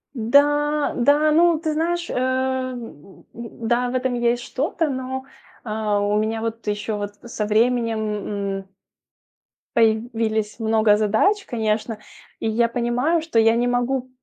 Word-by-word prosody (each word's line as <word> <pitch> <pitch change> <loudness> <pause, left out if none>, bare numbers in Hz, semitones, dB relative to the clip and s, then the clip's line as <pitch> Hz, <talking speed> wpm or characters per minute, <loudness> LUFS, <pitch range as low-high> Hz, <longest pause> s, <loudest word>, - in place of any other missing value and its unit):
Да, 290 +5 +2
да, 290 +5 +4
ну, 335 +1 +4
ты 315 -1 -2
знаешь, 345 +2 -1
э, - - -3
м, 255 - -3
м, 230 -1 -8
да, 245 +1 +1
в 255 - -4
этом 255 0 0
есть 240 0 0
что-то, 310 +3 -1
но, 260 0 -4 0.4
э, 225 - -8
у 210 -1 0
меня 220 +1 -1
вот 225 -1 -5
ещё 210 +1 -2
вот 205 0 -5
со 230 -3 -4
временем, 230 +1 +1 0.6
м 195 - -11 1.1
появились 220 -1 +1
много 220 -1 +3
задач, 220 - +2
конечно. 220 -1 -2 0.4
И - - -2
я 235 +2 +2
понимаю, 245 +8 0
что 315 -8 0
я 225 +1 +4
не 240 +1 +1
могу 245 +1 -1
240 Hz, 145 wpm, -22 LUFS, 220-260 Hz, 1.1 s, да